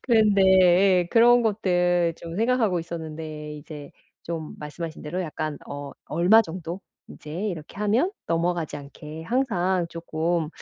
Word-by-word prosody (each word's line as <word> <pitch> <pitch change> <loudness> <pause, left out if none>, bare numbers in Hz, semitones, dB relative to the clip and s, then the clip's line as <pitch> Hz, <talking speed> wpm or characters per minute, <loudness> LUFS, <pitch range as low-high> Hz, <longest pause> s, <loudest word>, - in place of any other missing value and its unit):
그런데 215 -5 +4 0.6
예, 175 - -9
그런 240 +1 +6
것들 175 -5 +1
좀 170 +1 -7
생각하고 225 -5 +2
있었는데 155 -2 -7
이제 145 -1 -10 0.3
좀 160 -2 -5
말씀하신 155 +2 -7
대로 165 +5 -3
약간 155 -2 -4
어 145 0 -6
얼마 180 +8 +5
정도 175 +1 -6 0.3
인제 150 - -11 0.2
이렇게 160 -2 -7
하면 225 - +2 0.2
넘어가지 170 -2 -1
않게 150 +3 -10
항상 185 -7 0
쪼끔 165 -1 -2
170 Hz, 285 characters per minute, -25 LUFS, 155-200 Hz, 0.6 s, 그런